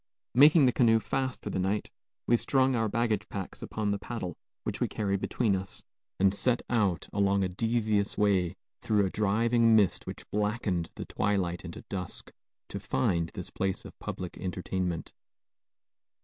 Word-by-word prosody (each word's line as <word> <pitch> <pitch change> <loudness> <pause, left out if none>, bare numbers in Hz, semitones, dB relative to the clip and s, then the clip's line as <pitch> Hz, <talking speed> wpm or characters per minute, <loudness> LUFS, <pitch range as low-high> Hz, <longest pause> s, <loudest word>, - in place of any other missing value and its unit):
Making 145 +3 +7
the 125 - +5
canoe 115 -2 +4
fast 130 +3 -2
for 105 - -4
the - - -1
night, 95 +3 -1 0.3
we 120 - +4
strung 130 +2 +2
our 110 -2 +1
baggage 110 -2 0
packs 95 -2 -6
upon 105 -2 -2
the 100 - -1
paddle 100 -8 -5 0.3
which - - -4
we - - +3
carried 100 -2 -1
between 110 -6 +1
us, 95 0 -5 0.4
and 95 0 +4
set 120 +4 +1
out 100 -8 +1
along 100 -1 +2
a - - +1
devious 110 +1 0
way, 95 -5 +2 0.2
through 105 -2 +2
a 95 - -2
driving 115 +2 +3
mist 105 -4 +2
which - - -7
blackened 105 -5 0
the - - -6
twilight 95 -4 -1
into 85 -2 -8
dusk, 90 -3 -6 0.4
to - - -5
find 85 +4 0
this - - -6
place 95 0 -2
of - - -12
public 90 -1 -6
entertainment. 90 -1 -3
100 Hz, 165 wpm, -29 LUFS, 95-115 Hz, 0.4 s, Making